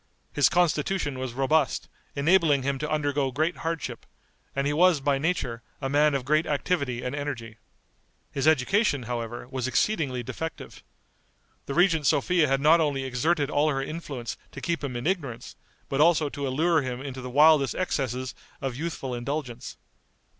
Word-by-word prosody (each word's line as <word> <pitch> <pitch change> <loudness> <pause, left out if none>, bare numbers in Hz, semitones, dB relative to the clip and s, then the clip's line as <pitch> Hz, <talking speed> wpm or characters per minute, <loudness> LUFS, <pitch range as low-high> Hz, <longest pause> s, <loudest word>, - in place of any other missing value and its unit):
His 145 -3 +4
constitution 165 -4 +1
was 130 -2 -4
robust, 135 0 +1 0.3
enabling 150 -2 +3
him 135 0 -1
to 150 - -3
undergo 145 -3 0
great 155 +7 0
hardship, 165 -1 -4 0.5
and 140 0 0
he 145 - +1
was, 175 0 +4
by 140 0 +1
nature, 135 -7 -1 0.2
a 135 - -3
man 145 0 +4
of 130 -2 -2
great 155 +4 +2
activity 140 -5 -1
and 125 - -3
energy. 125 -6 -5 0.7
His 140 +1 -1
education, 155 - +3
however, 120 0 -5
was 130 -2 -2
exceedingly 135 - 0
defective. 145 +7 -6 0.9
The 140 - -3
regent 165 -5 +3
Sophia 160 +2 +3
had 135 0 +1
not 160 +3 +6
only 140 -3 0
exerted 140 +4 0
all 150 +2 +2
her 135 -2 0
influence 140 -6 -5 0.2
to - - -7
keep 170 -3 -2
him 135 -3 -3
in 120 - -4
ignorance, 155 -10 -3 0.3
but 135 +1 0
also 160 -2 +4
to 140 0 -4
allure 160 +5 +2
him 125 -2 -4
into 135 -1 -6
the 125 - -6
wildest 150 +1 +5
excesses 130 -7 -2 0.3
of 135 -3 -3
youthful 145 -3 -4
indulgence. 125 0 -5
140 Hz, 160 wpm, -26 LUFS, 130-160 Hz, 0.9 s, not